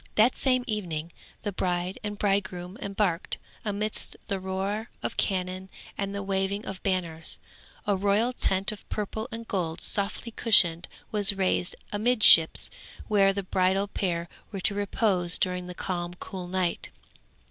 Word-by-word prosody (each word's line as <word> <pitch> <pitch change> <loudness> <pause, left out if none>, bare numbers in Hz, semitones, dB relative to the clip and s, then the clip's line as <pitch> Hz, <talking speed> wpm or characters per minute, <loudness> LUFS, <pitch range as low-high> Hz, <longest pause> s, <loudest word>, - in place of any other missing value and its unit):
That 225 +4 +4
same 255 -2 +2
evening 170 -8 -3 0.3
the 205 - -2
bride 180 0 -2
and 205 -1 -4
bridegroom 190 -3 -1
embarked, 195 -5 -1 0.3
amidst 210 0 -2
the 195 - 0
roar 195 +4 -3
of - - -3
cannon 185 -1 -1 0.3
and 200 0 -3
the 200 - -3
waving 195 +1 -1
of 195 -1 -6
banners. 170 -4 -2 0.5
A 205 - +2
royal 205 +5 +2
tent 195 -2 +2
of 215 - -11
purple 220 +2 -3
and 230 0 -7
gold 170 -4 -2
softly 205 +3 -1
cushioned 180 -8 +4 0.2
was 205 -1 +5
raised 190 -2 0 0.2
amidships 210 -6 +7 0.4
where 200 -2 +5
the 200 0 -3
bridal 190 +2 +1
pair 175 -4 -2 0.2
were 195 -3 -5
to 200 - +2
repose 200 -3 0
during 180 -2 -1
the 180 - -7
calm 175 -1 -3
cool 185 -1 -7
night. 180 -1 -1
195 Hz, 145 wpm, -27 LUFS, 180-210 Hz, 0.5 s, amidships